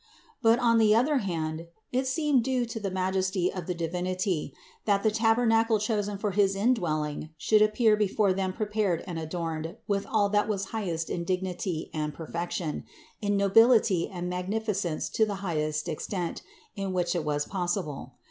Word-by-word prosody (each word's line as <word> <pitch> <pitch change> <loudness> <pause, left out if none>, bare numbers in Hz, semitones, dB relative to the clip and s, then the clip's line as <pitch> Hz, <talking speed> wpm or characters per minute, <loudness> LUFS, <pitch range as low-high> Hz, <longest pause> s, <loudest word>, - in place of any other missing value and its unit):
But 225 +1 +5
on 230 -2 +3
the 215 -1 +5
other 280 +6 +3
hand 165 -4 -3 0.2
it 260 +1 0
seemed 290 -3 +2
due 255 -1 0
to 225 -1 -5
the 200 -2 -2
majesty 185 0 0
of 180 -4 -6
the 180 - -2
Di 170 -1 -2
vinity, 180 -2 -2 0.3
that 200 -2 +2
the 215 - +3
tabernacle 225 0 +3
chosen 210 -1 -1
for 205 0 -1
his 195 0 +2
indwelling 160 -9 0
should 215 +6 +3
appear 215 +1 +4
before 210 -1 +2
them 190 0 -1
prepared 210 -4 -1
and 175 -3 -4
adorned 160 0 -4
with 200 -1 -1
all 210 -2 +2
that 205 0 +2
was 195 -2 -2
highest 175 -7 -2
in 170 - -2
dignity 180 -2 -2
and 150 -2 -3
perfection, 170 0 -4 0.4
in 205 -1 +1
nobility 200 -2 +4
and 180 -2 -5
magnificence 185 -1 -2
to 220 - +2
the 210 -2 0
full 155 -4 -2
extent, 175 +2 -4 0.3
in 195 -2 -3
which 175 -1 0
it 170 - 0
was 145 -1 -1
pos 180 -1 -1
sible. 145 -8 -6
195 Hz, 170 wpm, -28 LUFS, 170-215 Hz, 0.4 s, But